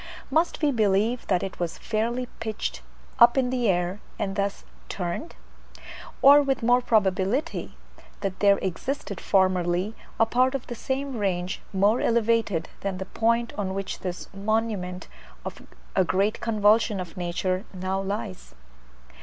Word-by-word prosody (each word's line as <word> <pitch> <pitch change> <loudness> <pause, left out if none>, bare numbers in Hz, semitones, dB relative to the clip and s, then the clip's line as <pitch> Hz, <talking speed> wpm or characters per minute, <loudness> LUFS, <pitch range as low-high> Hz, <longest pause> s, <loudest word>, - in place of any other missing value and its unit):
Must 325 0 +1
we 295 - +4
believe 220 +1 +1
that 185 -3 +2
it 195 - -6
was 175 -2 -2
fairly 230 +3 -1
pitched 220 -1 -3 0.4
up 240 +2 +7
in 255 -2 +2
the 245 -4 +1
air, 180 +2 0 0.2
and 195 -2 -2
thus 200 0 -2 0.3
turned? 180 - -4 0.9
Or, 285 +2 +9
with 270 -3 -1
more 245 +2 +4
probability, 215 - 0 0.4
that 195 -2 -3
there 200 -1 +5
existed 200 - -3
formerly 185 +1 +2 0.3
a 225 - +6
part 255 +4 +2
of 270 - -4
the - - -6
same 265 +2 -3
range 185 -2 -1
more 205 +5 +3
elevated 230 -7 +1
than 195 -2 -3
the 190 - -4
point 230 +3 0
on 190 -1 -2
which 195 0 -4
this 180 -1 -5
monument 200 -3 -2 0.4
of - - -6 0.3
a - - +5
great 195 +4 0
convulsion 215 -1 +3
of 180 -1 -6
nature 185 +1 -1
now 190 +1 -2
lies. 195 - -5
205 Hz, 145 wpm, -26 LUFS, 185-235 Hz, 0.9 s, Or